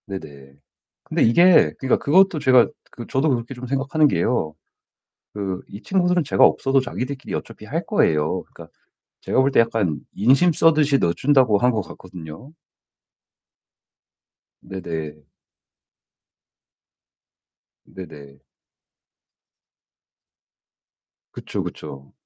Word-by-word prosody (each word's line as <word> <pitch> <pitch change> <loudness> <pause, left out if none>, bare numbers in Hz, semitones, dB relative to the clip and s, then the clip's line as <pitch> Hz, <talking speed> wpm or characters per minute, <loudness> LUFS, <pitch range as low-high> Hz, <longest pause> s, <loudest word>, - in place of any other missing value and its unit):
네네. 70 -8 -10 0.5
근데 - - -1
이게 170 +10 +5
그러니까 130 - +1
그것도 180 +3 +3
제가 130 -4 +4 0.2
그 120 - -10
저도 135 +4 0
그렇게 120 0 -3
좀 125 0 -9
생각하는 140 +4 +1
게요 100 - -1 0.8
그 95 -3 -4
이 100 - -10
친구들은 180 0 +1
제가 140 - +2
없어도 135 0 +2
자기들끼리 130 +2 -6
어차피 - - -7
할 - - -4
거예요. 75 -1 0
그러니까 - - -15 0.5
제가 - - 0
볼 135 +1 +2
때 - - 0
약간 110 -9 -1 0.2
인심 135 - +3
쓰듯이 150 -3 +3
넣어준다고 125 +4 +2
한 125 +4 +2
것 110 -3 -2
같거든요. 90 - -12 2.1
네네. 80 -5 -7 2.6
네네. 70 -7 -13 2.9
그쵸. - - -6
그쵸. 70 0 -10
120 Hz, 230 characters per minute, -21 LUFS, 90-140 Hz, 2.9 s, 이게